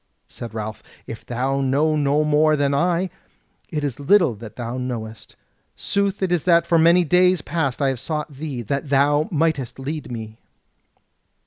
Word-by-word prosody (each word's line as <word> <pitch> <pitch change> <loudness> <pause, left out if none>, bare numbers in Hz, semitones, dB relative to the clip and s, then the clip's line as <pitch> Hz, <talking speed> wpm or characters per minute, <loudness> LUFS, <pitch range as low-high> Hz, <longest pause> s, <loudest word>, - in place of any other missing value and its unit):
Said 115 -2 -9
Ralph: 110 0 -5 0.2
"If 115 - -8
thou 135 +3 -1
know 145 +4 +2
no 145 0 +2
more 150 +1 +3
than 140 -1 +1
I, 175 +4 +1 0.6
it 150 -3 -3
is 140 -3 -3
little 170 - +4
that 110 0 -11
thou 120 +1 -4
knowest. 115 -3 -6 0.4
Sooth 200 -1 -1
it 185 - 0
is 175 -4 +1
that 170 -2 +4
for 170 -1 +3
many 170 +2 +5
days 180 0 +3
past 145 -5 -1
I 135 - +3
have 130 -2 -3
sought 150 0 -4
thee 135 -3 -5
that 140 +5 -3
thou 145 +2 +3
mightest 160 - -1
lead 140 0 -5
me." 110 -1 -7
145 Hz, 165 wpm, -22 LUFS, 125-165 Hz, 0.6 s, many